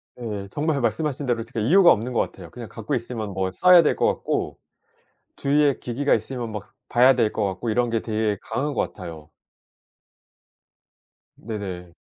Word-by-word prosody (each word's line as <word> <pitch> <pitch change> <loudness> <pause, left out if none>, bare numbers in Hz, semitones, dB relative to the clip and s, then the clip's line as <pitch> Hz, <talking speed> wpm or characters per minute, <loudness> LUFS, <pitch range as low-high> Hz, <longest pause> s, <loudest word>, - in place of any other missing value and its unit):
네. 105 -5 -5
정말 150 -2 0
말씀하신 135 +5 -1
대로 120 -3 0
특히 115 -1 -5
이유가 180 +2 +7
없는 115 +4 0
것 - - +1
같아요. 90 -4 -4
그냥 120 +4 -9
갖고 110 -2 -5
있으면 115 -3 -4
뭐 95 0 -1
써야 180 - +7
될 - - +2
것 - - +1
같고 - - -2 0.8
주위에 145 0 +2
기기가 135 +4 0
있으면 115 +1 -2
막 105 -3 -8
봐야 125 +2 +5
될 115 -4 +2
것 110 - -2
같고 95 +4 -3
이런 120 +2 +1
게 115 -1 0
되게 110 -2 -1
강한 145 +2 -2
것 - - 0
같아요. 80 -5 -9 2.1
네네. 95 -5 -6
115 Hz, 315 characters per minute, -24 LUFS, 105-135 Hz, 2.1 s, 이유가